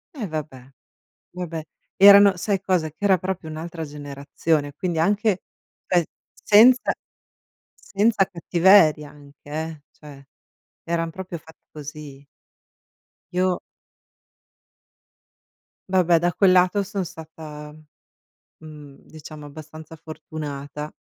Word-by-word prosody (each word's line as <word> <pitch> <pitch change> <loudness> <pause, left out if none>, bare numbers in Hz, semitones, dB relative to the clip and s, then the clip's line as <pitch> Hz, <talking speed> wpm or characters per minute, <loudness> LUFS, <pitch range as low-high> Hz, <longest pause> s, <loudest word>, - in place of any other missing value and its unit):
Eh, 235 -8 -4
vabbè. 150 -5 -6 0.7
Vabbè, 175 -3 -5 0.4
erano 200 -1 +8
sai 195 +1 -1
cosa, 185 -5 0
che 150 - -24
era 195 -2 +3
proprio 185 -2 -5
un'altra 165 +1 -6
generazione. 145 +1 -3
Quindi 175 +3 -3
anche, 205 +2 +1 0.4
sai, 175 -2 +2 0.3
senza 240 +5 +5 0.9
senza 205 0 +2
cattiveria 170 -4 +3
anche, 145 -1 -18
eh, 155 0 -5
cioè 145 -2 -14 0.6
eran 165 -1 -2
proprio 180 0 -7
fatti 160 +1 -20
così. 145 -2 -10 1.1
Io 180 0 +1 2.3
Vabbè 180 -2 +3
da 175 +2 +1
quel 190 0 +4
lato 185 +3 +3
son 200 0 -3
stata, 155 -3 -10 0.9
mhmm, 150 -3 -13
diciamo 155 -1 -11
abbastanza 155 +2 -11
fortunata. 150 -2 -7
160 Hz, 100 wpm, -23 LUFS, 150-185 Hz, 2.3 s, erano